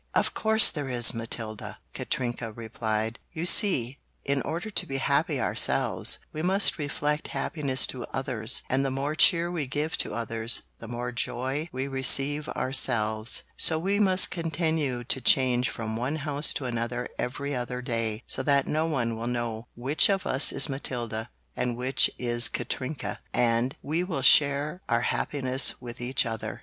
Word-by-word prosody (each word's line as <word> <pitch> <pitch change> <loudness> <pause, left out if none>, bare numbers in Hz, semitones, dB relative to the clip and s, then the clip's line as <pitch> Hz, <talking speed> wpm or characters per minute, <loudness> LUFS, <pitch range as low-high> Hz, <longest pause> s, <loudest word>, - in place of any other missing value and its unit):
"Of - - +1
course 220 0 +6
there 145 -4 -5
is, 120 -1 +5
Matilda!" 115 -2 -6 0.2
Katrinka 120 -2 -4
replied. 110 0 -4
"You 165 0 -3
see, 140 - +3 0.3
in 140 0 0
order 175 +7 -5
to - - -1
be 135 - -3
happy 140 +2 0
ourselves - - +3 0.2
we 155 - -4
must 190 +1 +3
reflect 150 +1 -2
happiness 140 -5 0
to 125 -2 -5
others, 120 -4 -1
and 135 +1 0
the 135 - -1
more 135 +3 -3
cheer 170 +1 +5
we 160 -6 -3
give 150 +4 -3
to - - 0
others 115 0 -1 0.2
the 115 - -10
more 120 +1 -5
joy 130 +6 -3
we 130 +1 -4
receive 140 +2 +4
ourselves, 120 +1 +1
so 160 - +2
we 195 +5 -1
must 190 -3 +3
continue 160 -6 -2
to 130 +2 0
change 125 -2 +3
from 110 -1 -5
one 125 +6 -2
house 145 -1 +1
to 135 - -4
another 120 0 -3
every 140 +3 -4
other 125 -1 -4
day 115 -2 -3
so - - +1
that 140 -1 +2
no 155 +2 -1
one 120 -7 -2
will 115 +1 -5
know 120 -1 -4
which 135 +10 +2
of 195 -1 0
us 130 +2 +3
is - - +3
Matilda 120 -5 -5 0.3
and 120 -1 -2
which 130 +2 +2
is 120 -1 +2
Katrinka 135 +2 -4 0.2
and 120 +2 +1
we 160 +5 -1
will 160 -8 -4
share 145 +5 +4
our 120 0 +1
happiness 130 +1 0
with 120 -1 -9
each 125 +2 0
other." 110 -1 -5
130 Hz, 165 wpm, -26 LUFS, 120-150 Hz, 0.3 s, course